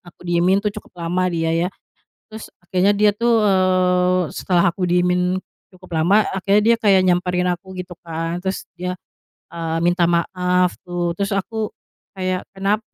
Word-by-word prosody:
aku - - -19
diemin 175 +3 +3
tuh 210 - 0
cukup 210 - -10
lama 185 +2 +1
dia 165 -1 0
ya. 170 +2 +1 0.6
Terus, 220 0 -9 0.2
kayanya 190 +2 +4
dia 210 0 +5
tuh, 235 0 +2
eee, 185 -2 +3
setelah 175 -2 +1
aku 185 - -7
diemin 180 +1 +2 0.3
cukup 185 -1 -17
lama, 195 +7 +4
akhirnya 200 +2 +2
dia - - -2
kayak 195 -3 +5
nyamperin 180 0 +1
aku, 180 +2 -5
gitu 180 0 -7
kan. 165 +1 -3
Terus 190 0 -3
dia, 180 0 -4 0.6
eee, 165 -1 -3
minta 175 0 +3
maaf 180 +1 +1
gitu, 175 -1 -2
terus 200 0 -2
aku, 215 +2 -2 0.5
kayak, 185 -1 -2
kenap 195 +2 0
180 Hz, 160 wpm, -20 LUFS, 175-195 Hz, 0.6 s, dia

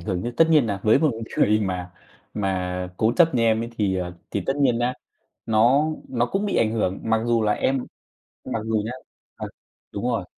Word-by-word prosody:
hưởng 95 -4 -3
chứ. 120 - -3
Tất 165 0 +4
nhiên 150 -7 +5
là 100 -2 -3
với 110 +4 +4
một 155 0 +2 0.3
người 105 +1 +4
mà 90 -3 -3 0.4
mà 90 -2 -2
cố 110 +1 +2
chấp 165 -5 +4
như 115 - +2
em 110 0 +2
ấy 115 - -6
thì, 95 -3 +1
ờ, 90 -1 -3 0.2
thì 100 - -2
tất 135 - 0
nhiên 130 -5 +2
nhá, 120 +1 0 0.5
nó 120 +7 +4 0.2
nó 120 -2 +1
cũng 195 +10 -2
bị 200 - -1
ảnh 110 -1 +2
hưởng. 100 -4 -1
Mặc 110 0 +1
dù 120 -1 +2
là 105 - +2
em 130 +4 0 0.6
mặc 115 - -3
dù 110 -1 0
nhá 115 - -4 0.4
ờ, - - -6 0.4
đúng 100 - -5
rồi, 115 -6 -1
110 Hz, 215 wpm, -23 LUFS, 100-125 Hz, 0.6 s, nhiên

